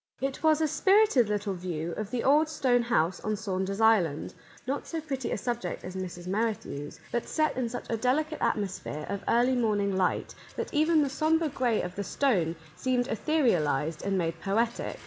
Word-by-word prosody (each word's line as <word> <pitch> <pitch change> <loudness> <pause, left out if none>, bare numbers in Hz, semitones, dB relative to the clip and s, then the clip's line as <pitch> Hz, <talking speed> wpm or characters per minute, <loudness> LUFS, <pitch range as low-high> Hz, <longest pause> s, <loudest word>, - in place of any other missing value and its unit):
It 270 0 -3
was 315 -1 +4
a 315 - +3
spirited 380 - +4
little 205 -1 -1
view 170 -2 -4
of 210 +4 -4
the 240 +1 -2
old 300 +3 +4
stone 255 -6 +2
house 185 -7 +1
on 215 0 -2
Saunder's 195 0 -3
Island; 200 -10 +3 0.3
not 275 +3 -3
so 330 - -3
pretty 270 -5 -4
a - - 0
subject 240 +3 -3
as 185 +1 -7
Mrs. 180 -2 -6
Merrithew's, 195 -7 -3
but 240 - -2
set 310 -1 +1
in 250 -2 -1
such 245 - -6
a 230 - -1
delicate 300 +7 0
atmosphere 185 -7 -2
of 200 0 -3
early 245 +2 +3
morning 205 -5 +1
light 185 -1 0 0.2
that - - -4
even 310 +1 +4
the 280 - -1
sombre 315 +2 +2
gray 245 -5 0
of 180 0 -5
the 200 - -4
stone 185 - +1 0.2
seemed 250 -1 0
etherialized 170 - +1
and 195 -1 0
made 165 -2 -2
poetic. 225 +4 -1
225 Hz, 185 wpm, -28 LUFS, 185-270 Hz, 0.3 s, was